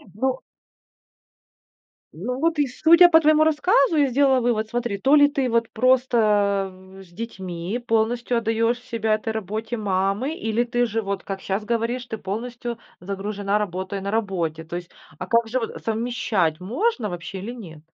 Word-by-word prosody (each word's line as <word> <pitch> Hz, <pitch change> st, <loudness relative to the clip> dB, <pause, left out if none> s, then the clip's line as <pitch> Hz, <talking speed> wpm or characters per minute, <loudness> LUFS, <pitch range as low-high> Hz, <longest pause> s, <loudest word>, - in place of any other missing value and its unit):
Ну. 260 Hz, +4 st, 0 dB, 1.7 s
Ну, 245 Hz, +10 st, -4 dB
вот 325 Hz, +1 st, +1 dB
и 290 Hz, -1 st, +2 dB
судя 335 Hz, +7 st, +6 dB
по 320 Hz, -1 st, +7 dB
твоему 310 Hz, 0 st, +4 dB
рассказу, 315 Hz, 0 st, +3 dB
я 290 Hz, -2 st, +4 dB
сделала 265 Hz, 0 st, +3 dB
вывод, 230 Hz, -3 st, 0 dB
смотри: 240 Hz, -4 st, -2 dB
то 270 Hz, +9 st, +4 dB
ли 290 Hz, -1 st, +7 dB
ты 275 Hz, -3 st, -1 dB
вот 230 Hz, -1 st, +1 dB
просто 215 Hz, -6 st, +2 dB, 0.3 s
с -, -, -18 dB
детьми 190 Hz, +1 st, -5 dB
полностью 235 Hz, +2 st, +1 dB
отдаешь 230 Hz, +1 st, +1 dB
себя 225 Hz, -3 st, 0 dB
этой 220 Hz, +1 st, -4 dB
работе 220 Hz, +2 st, -4 dB
мамы, 200 Hz, +5 st, -1 dB
или 225 Hz, -6 st, -1 dB
ты 245 Hz, 0 st, 0 dB
же, 225 Hz, 0 st, -2 dB
вот 200 Hz, -2 st, -4 dB
как 195 Hz, -1 st, -5 dB
щас 200 Hz, +2 st, -3 dB
говоришь, 235 Hz, +2 st, -1 dB
ты 225 Hz, -2 st, -5 dB
полностью 235 Hz, +4 st, -5 dB, 0.2 s
загружена, 200 Hz, +2 st, -2 dB
работая 190 Hz, 0 st, -3 dB
на 200 Hz, -, -4 dB
работе. 180 Hz, -7 st, -2 dB
То 165 Hz, +2 st, -5 dB
есть, 175 Hz, -1 st, -9 dB, 0.3 s
а 185 Hz, -, -5 dB
как 230 Hz, +1 st, +2 dB
же 255 Hz, +3 st, 0 dB
вот 225 Hz, -, -6 dB
совмещать, 220 Hz, -8 st, -1 dB
можно 245 Hz, -, -1 dB
вообще 175 Hz, +1 st, -6 dB
или 205 Hz, +6 st, -6 dB
нет? 185 Hz, -11 st, -10 dB
225 Hz, 165 wpm, -23 LUFS, 195-250 Hz, 1.7 s, по